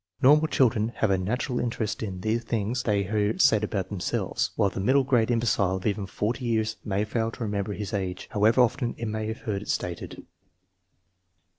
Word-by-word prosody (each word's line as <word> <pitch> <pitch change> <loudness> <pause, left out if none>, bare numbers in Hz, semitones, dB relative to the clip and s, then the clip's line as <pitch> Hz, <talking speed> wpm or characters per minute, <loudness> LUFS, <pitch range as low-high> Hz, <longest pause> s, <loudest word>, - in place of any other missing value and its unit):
Normal 150 +4 +5
children 115 -5 +2
have 110 - +1
a 95 - +3
natural 125 +6 -1
interest 115 -3 -2
in 95 -4 -4
the 110 +4 +1
things 115 +1 -2
they 105 -4 +1
hear 105 +2 0
said 110 -1 +4
about 100 -3 -2
themselves, 100 -4 -1
while 100 -2 +2
the - - -5
middle 130 +8 +3
grade 125 -4 +2
im 120 -1 +2
becile 95 -5 +1
of 95 - -6
even 100 -2 -1
40 115 +6 -2
years 110 -2 0
may 105 0 -1
fail 110 +1 -1
to 115 - -6
remember 105 -1 -2
his 105 +2 -5
age, 95 -3 -3
how 105 -2 -1
ever 115 +3 +4
often 120 0 +1
he 115 - -4
may 110 0 -3
have 110 +2 -5
heard 105 -6 -3
it - - -10
stated. 90 -1 -4
110 Hz, 200 wpm, -26 LUFS, 100-120 Hz, -, Normal